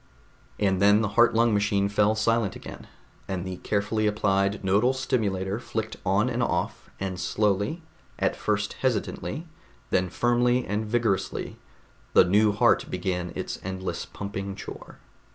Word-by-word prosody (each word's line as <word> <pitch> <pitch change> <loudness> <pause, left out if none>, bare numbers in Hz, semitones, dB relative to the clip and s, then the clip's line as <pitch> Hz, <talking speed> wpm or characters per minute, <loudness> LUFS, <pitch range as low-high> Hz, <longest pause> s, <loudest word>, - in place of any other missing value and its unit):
And 95 -2 +1
then 105 +1 +6
the 105 - 0
heart 120 +3 +4
lung 115 0 +4
machine 100 -1 +2
fell 105 +1 +2
silent 110 -2 +1
again, - - -10 0.4
and 95 -2 -3
the 95 -1 -5
carefully 105 +2 0
applied 100 -1 +1
nodal 105 +7 +3
stimulator 105 -6 -1
flicked 110 -2 -4
on 100 +4 +2
and 125 -1 -1
off, 85 -7 -2
and 95 -2 -3
slowly, 105 - 0 0.3
at - - +1
first 105 0 -1
hesitantly, 130 +6 -2 0.4
then 90 0 +2
firmly 120 +4 +2
and 105 +2 -2
vigorously, 110 -4 -1 0.5
the - - +7
new 105 +3 +4
heart 100 - +3
began 90 -1 -2
its - - -4
endless 95 0 -4
pumping 100 -1 -5
chore. - - -9
105 Hz, 140 wpm, -26 LUFS, 95-115 Hz, 0.5 s, the